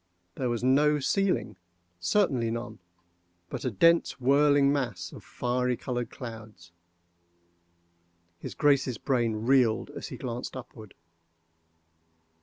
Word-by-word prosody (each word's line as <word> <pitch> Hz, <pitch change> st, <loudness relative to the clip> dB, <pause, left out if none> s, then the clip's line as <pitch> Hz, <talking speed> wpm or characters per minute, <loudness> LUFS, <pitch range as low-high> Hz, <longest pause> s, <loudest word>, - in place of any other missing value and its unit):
—There 125 Hz, +4 st, -2 dB
was 120 Hz, 0 st, -2 dB
no 150 Hz, +4 st, +4 dB
ceiling—certainly 115 Hz, -, -1 dB
none—but 90 Hz, -6 st, -9 dB
a -, -, +1 dB
dense 165 Hz, -, +3 dB
whirling 140 Hz, +1 st, +4 dB
mass 120 Hz, -11 st, -3 dB
of -, -, -11 dB
fiery 125 Hz, 0 st, -1 dB
colored 120 Hz, -2 st, -3 dB
clouds. 110 Hz, -8 st, -10 dB, 1.7 s
His -, -, -7 dB
Grace's 135 Hz, -5 st, +2 dB
brain 115 Hz, -4 st, -1 dB
reeled 125 Hz, -4 st, +3 dB
as -, -, -7 dB
he -, -, -8 dB
glanced 125 Hz, +1 st, -5 dB
upward. 110 Hz, -4 st, -11 dB
120 Hz, 100 wpm, -28 LUFS, 95-135 Hz, 1.7 s, no